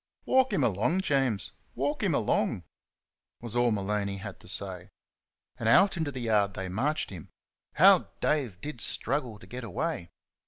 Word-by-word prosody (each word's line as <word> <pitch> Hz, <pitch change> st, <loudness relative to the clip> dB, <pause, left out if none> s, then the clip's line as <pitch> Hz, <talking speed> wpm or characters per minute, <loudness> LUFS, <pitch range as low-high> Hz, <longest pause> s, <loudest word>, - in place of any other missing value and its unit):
"Walk 260 Hz, 0 st, +3 dB
'm 145 Hz, -, +1 dB
along, 120 Hz, -, +1 dB
Jaimes 135 Hz, -, 0 dB, 0.2 s
walk -, -, -1 dB
'm -, -, +1 dB
along," -, -, 0 dB, 0.8 s
was 120 Hz, -1 st, -7 dB
all 120 Hz, 0 st, +3 dB
Maloney 100 Hz, -1 st, -1 dB
had 100 Hz, 0 st, -8 dB
to -, -, -15 dB
say. 95 Hz, -2 st, -3 dB, 0.7 s
And -, -, +1 dB
out 195 Hz, -1 st, +6 dB
into 160 Hz, -4 st, -2 dB
the 130 Hz, -2 st, -6 dB
yard 105 Hz, -4 st, +1 dB
they 95 Hz, -1 st, -4 dB
marched 135 Hz, +11 st, -1 dB
him. 90 Hz, -5 st, -9 dB, 0.5 s
How -, -, +6 dB
Dave 130 Hz, -12 st, 0 dB
did 150 Hz, -6 st, -6 dB
struggle 125 Hz, -4 st, 0 dB
to -, -, -15 dB
get 125 Hz, 0 st, -7 dB
away! 115 Hz, -, -3 dB
115 Hz, 160 wpm, -29 LUFS, 100-145 Hz, 0.8 s, out